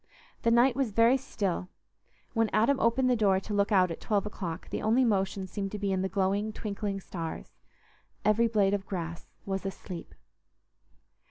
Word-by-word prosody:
The 230 - +2
night 240 +2 +5
was 270 -3 0
very 230 +4 +5
still: 200 -9 -2 0.6
when 225 -2 +2
Adam 260 +5 +3
opened 245 +3 +3
the 250 - +4
door 200 -4 +3
to 210 - -6
look 200 +1 +1
out 185 -3 +4
at 165 - -6
twelve 205 -2 0
o'clock, 180 -4 -5
the - - -2
only 235 +4 +3
motion 195 -3 0
seemed 195 +1 -4
to - - -2
be 200 -1 -1
in 190 -1 0
the 190 - -1
glowing, 200 +3 0
twinkling 205 -2 -3
stars; 165 - -7 0.7
every 215 +3 +4
blade 205 -3 +2
of 195 -2 -2
grass 170 -3 -5 0.2
was 195 -1 -2
asleep. 185 -2 -7
200 Hz, 175 wpm, -29 LUFS, 190-225 Hz, 0.7 s, night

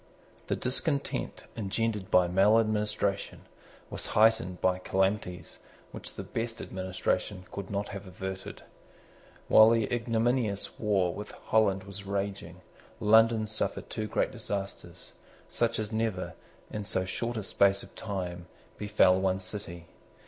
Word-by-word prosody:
The - - +1
discontent 140 +3 -2
engendered 105 -1 -1
by 90 -1 +5
maladministration 105 +1 +2 0.5
was - - -4
heightened 110 -5 +4
by 90 0 +2
calamities 95 -2 -1 0.3
which - - -8
the - - -5
best 115 0 -4
administration 95 0 -2
could 100 -1 -6
not 100 0 -2
have 100 -1 -7
averted. 95 +1 -6 0.8
While 110 +1 +8
the 115 -1 +3
ignominious 115 -2 0
war 95 -5 +2
with 105 0 -7
Holland 100 -3 +2
was 100 +1 -7
raging, 100 -3 -4 0.4
London 110 +1 +5
suffered 110 0 -2
two 110 - -2
great - - 0
disasters, 100 -1 -5 0.4
such 115 -1 0
as 110 0 -3
never, 110 -4 -1 0.4
in 105 - -3
so 95 -2 -1
short 115 +5 -3
a 110 - -2
space 100 0 +3
of - - -13
time, 90 -4 -5 0.3
befel 105 -3 +4
one 95 0 +1
city. 90 -3 -6
100 Hz, 125 wpm, -29 LUFS, 95-110 Hz, 0.8 s, While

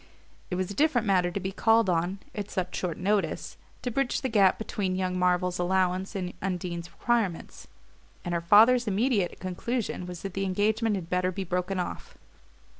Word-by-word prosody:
It 180 - -2
was 185 +1 -2
a - - -4
different 260 -2 +2
matter 185 -3 +3
to 175 - -3
be 190 0 -3
called 225 +2 +3
on, 175 +2 0 0.2
at 205 -2 -5
such 180 -1 -3
short 175 -3 -2
notice, 200 +2 -1 0.3
to 245 - -2
bridge 275 +1 0
the 260 - -1
gap 200 -4 +4
between 195 -4 -2
young 185 -1 -1
Marvell's 180 0 +1
allowance 185 +2 0
and 180 -2 -3
Undine's 175 -2 -3
requirements; 225 -8 -1 0.6
and 175 - -2
her 170 - 0
father's 225 +7 +6
immediate 210 -2 +1
conclusion 185 +1 -3
was 180 -2 -8
that 195 -2 -5
the 195 - -2
engagement 210 +3 +1
had 180 -4 -5
better 180 0 +1
be 190 +2 -4
broken 180 +1 -2
off. 180 - -5
190 Hz, 180 wpm, -28 LUFS, 180-210 Hz, 0.6 s, father's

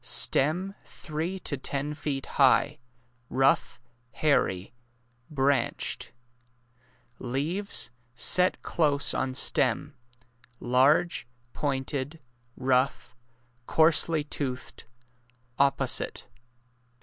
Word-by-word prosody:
Stem 175 +8 +3
three 160 +4 -5
to 145 - -2
ten 140 +3 -3
feet 145 -2 -4
high— - - +2 0.5
rough— 135 +2 +1 0.3
hairy 100 -10 0 0.6
—branched. 135 -3 -1 1.1
Leaves— 140 - -1 0.2
set 180 +9 +4
close 145 -4 +1
on 130 -1 -2
stem— - - +1 0.6
large— 135 +5 +2 0.3
pointed 140 +2 -3 0.4
—rough— 130 +1 0 0.5
coarsely 160 -1 +3
toothed 130 -3 -6 0.4
— 120 +1 -34
opposite. 140 0 +1
140 Hz, 75 wpm, -27 LUFS, 130-155 Hz, 1.1 s, set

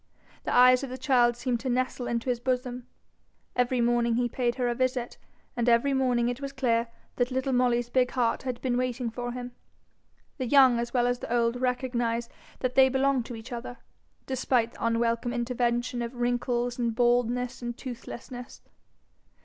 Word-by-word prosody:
The - - -1
eyes 250 +1 +6
of 270 - -4
the 255 - -6
child 245 -2 +3
seemed 245 -1 -1
to 260 - -3
nestle 255 0 -1
into 235 +1 -2
his 240 - -2
bosom. 250 0 -2 0.7
Every 250 0 +1
morning 235 -1 +2
he 245 +1 +1
paid 240 0 -1
her 250 -2 0
a 240 - +1
visit, 255 0 -2 0.4
and 240 0 +1
every 235 +4 +3
morning 250 -3 +2
it 245 +2 -3
was 275 -1 -4
clear 235 -3 +1 0.3
that 245 0 +1
little 260 +1 -1
Molly's 245 -1 +1
big 250 -1 +3
heart 240 -3 0
had 250 -2 -4
been 250 -2 +1
waiting 250 -1 -2
for 245 +1 -4
him. 245 0 -6 0.9
The 255 - -1
young 260 -2 +6
as 235 0 -3
well 245 -1 +2
as 245 0 0
the - - -7
old 240 +1 +1
recognize 240 -2 -1 0.3
that 255 -1 0
they 265 0 +6
belong 270 0 +2
to 240 - -7
each 225 +2 -10
other, 245 +1 -6 0.5
despite 250 -3 0
the - - -9
unwelcome 230 +1 0
intervention 240 0 -1
of 235 +2 -5
wrinkles 245 0 -1
and 235 -2 0
baldness 245 +1 +1
and 240 -1 -5
toothlessness. 245 0 -8
245 Hz, 180 wpm, -27 LUFS, 240-255 Hz, 0.9 s, eyes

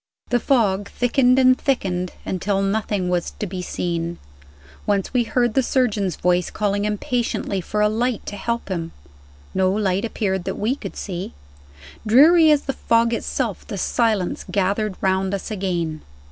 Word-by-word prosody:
The 245 - +2
fog 205 -7 +1
thickened 250 +1 +2
and 255 -1 +6
thickened, 185 -11 -1
until 195 +1 -1
nothing 200 -2 -1
was 180 -1 -1
to - - -3
be 185 -1 -5
seen. 170 -1 -3 0.7
Once 200 +2 0
we 245 -2 +2
heard 240 -1 +1
the 265 - +3
surgeon's 215 -8 0
voice, 180 0 +1
calling 205 -1 -1
impatiently 210 -2 -1
for 210 +4 -2
a 210 - +5
light 235 +2 -1
to 205 - -5
help 235 +2 -3
him. 165 -3 -3 0.6
No 185 0 +2
light 195 -1 0
appeared 190 -5 -2
that - - -3
we 225 +6 0
could - - -8
see. 180 - -5 0.7
Dreary 310 +9 +6
as 295 -1 +4
the 270 - -2
fog 230 -1 +2
itself, 230 -2 -3
the 205 - -5
silence 215 -2 0
gathered 200 +1 0
round 190 0 +1
us 200 - -6
again. 175 -6 -2
205 Hz, 160 wpm, -22 LUFS, 185-235 Hz, 0.7 s, and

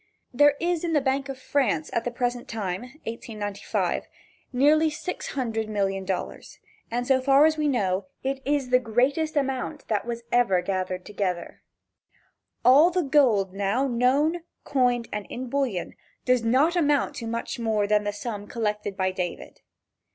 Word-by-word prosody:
There 290 +3 +5
is 345 -1 0
in 335 -1 -1
the 300 - +4
bank 270 0 -1
of 270 - -5
France 255 - 0
at 230 - -1
the - - 0
present 245 +1 -2
time 195 -4 -3 0.2
(1895) 215 -3 -3 0.4
nearly 300 +5 +4
six 310 +4 -5
hundred 225 -5 -2
million 195 -2 -1
dollars, 190 -1 -4 0.3
and 245 +2 -2
so 260 0 +3
far 275 +2 +5
as 315 0 +3
we 305 -1 0
know, 200 -6 0 0.2
it 270 0 -2
is 280 -1 0
the 250 - +6
greatest 265 +7 0
amount 275 +1 -2
that 215 -2 +1
was 235 0 -4
ever 195 -7 +3
gathered 185 -1 -2
together. 190 -4 -3 1.0
All 285 +7 +7
the 360 0 0
gold 240 -10 +3
now 205 +7 0
known, 270 +7 +2 0.2
coined 245 -3 +1
and 210 -1 -4
in 250 0 -5
bullion, 260 -11 -1 0.3
does 250 -1 +3
not 270 +9 +3
amount 295 -5 +2
to 230 - -5
much 235 +2 -4
more 220 -3 +1
than 210 0 +2
the 205 - -1
sum 205 0 -6
collected 210 -3 -3
by 185 0 +1
David. 180 -1 -5
245 Hz, 160 wpm, -25 LUFS, 205-275 Hz, 1.0 s, All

